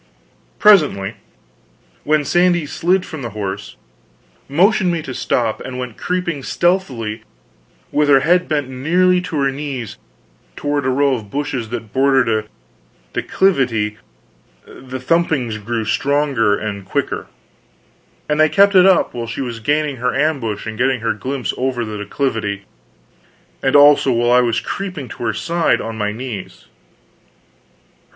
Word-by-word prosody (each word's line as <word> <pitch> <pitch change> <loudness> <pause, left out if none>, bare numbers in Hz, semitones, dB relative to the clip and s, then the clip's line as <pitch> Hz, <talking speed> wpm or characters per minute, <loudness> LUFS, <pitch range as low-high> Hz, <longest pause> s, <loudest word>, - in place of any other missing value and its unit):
Presently, 140 - +4 0.9
when 150 -1 +1
Sandy 175 -1 +2
slid 180 +5 0
from 160 - -7
the 120 - -4
horse, 100 0 -5 0.7
motioned 185 +5 +3
me 165 -2 -2
to 130 - -6
stop, 115 -3 -1
and 130 -1 -6
went 125 -3 -5
creeping 175 -5 -2
stealthily, 130 - -1 0.7
with 150 0 +2
her 135 -2 +6
head 180 +4 +2
bent 145 -3 -1
nearly 175 +8 +2
to 170 -3 -4
her 140 0 +2
knees, 135 -5 -6 0.6
toward 145 -2 -1
a - - +2
row 140 +1 +2
of 110 -5 -5
bushes 135 -3 -3
that 115 -3 -6
bordered 135 -1 +3
a 110 -1 0 0.7
declivity, 120 - +1 0.7
the 130 0 -9
thumpings 130 -6 0
grew 115 0 -2
stronger 135 -5 +1
and 100 -2 -5
quicker. 95 - -3 1.0
And 150 0 0
they 155 0 +5
kept 200 +3 +4
it 185 0 +7
up 190 -2 +3
while 120 -1 -4
she 115 +4 -4
was 120 -3 -4
gaining 145 +3 0
her 125 +1 -1
ambush 135 -8 -1
and 110 0 -6
getting 130 -1 +1
her 115 -1 0
glimpse 130 +4 -3
over 125 -2 -1
the 105 -1 -6
declivity; 105 -2 -2 1.0
and 135 - +1
also 145 -2 +6
while 120 0 +2
I 125 0 +6
was 120 -2 +1
creeping 180 -10 -5
to - - -8
her 110 - 0
side 165 +10 +1
on 115 0 -5
my 105 -1 -1
knees. 110 -3 -7
130 Hz, 145 wpm, -18 LUFS, 115-155 Hz, 1.0 s, it